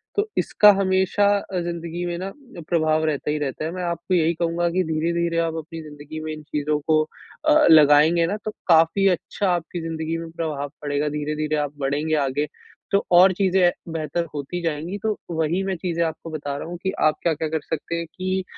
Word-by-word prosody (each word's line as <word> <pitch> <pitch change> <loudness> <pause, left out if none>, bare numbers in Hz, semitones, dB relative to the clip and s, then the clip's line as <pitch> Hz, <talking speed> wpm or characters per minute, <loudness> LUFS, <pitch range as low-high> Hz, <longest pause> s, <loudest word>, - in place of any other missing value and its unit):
तो 410 +1 +1
इसका 210 -1 +6
हमेशा 190 +1 +2
अ, 190 -2 -4
ज़िंदगी 170 0 -4
में 175 -1 -3
ना 190 +2 -5 0.4
प्रभाव 155 -2 +2
रहता 150 -1 -1
ही 150 - 0
रहता 145 +1 -3
है। 160 - -3
मैं 180 +1 -5
आपको 170 +1 -2
यही 165 -1 +3
कहूँगा 170 +1 0
कि 185 +2 +1
धीरे-धीरे 170 +1 -1
आप 165 - -4
अपनी 160 +1 -7
ज़िंदगी 150 +1 -9
में 155 - -4
इन 155 0 -9
चीज़ों 150 0 -1
को 155 -1 +4 0.4
अ, 305 0 +5
लगाएँगे 155 +2 +6
ना 205 +4 -2
तो 215 - -2 0.2
काफ़ी 165 +3 +5
अच्छा 190 +2 -1
आपकी 175 0 -2
ज़िंदगी 160 0 -3
में 165 0 -6
प्रभाव 150 -4 -3
पड़ेगा 145 0 -1
धीरे-धीरे 150 +1 -2
आप 145 - -9
बढ़ेंगे 145 +3 0
आगे, 145 +3 -1 0.4
तो 200 - +3
और 185 +2 +7
चीज़ें 185 -1 +3 0.2
बेहतर 165 +1 -2
होती 150 +5 -4
जाएँगी, 165 +4 -3
तो 220 - +1 0.2
वही 160 +3 0
मैं 190 -1 -1
चीज़े 170 -1 -1
आपको 165 0 -4
बता 145 -2 -4
रहा 145 - -6
हूँ 175 +1 -6
कि 190 - 0
आप 155 0 +4
क्या-क्या 160 -1 0
कर 160 - -1
सकते 160 +2 -4
हैं 170 - -3
कि, 185 +1 -1
165 Hz, 195 wpm, -23 LUFS, 155-175 Hz, 0.4 s, और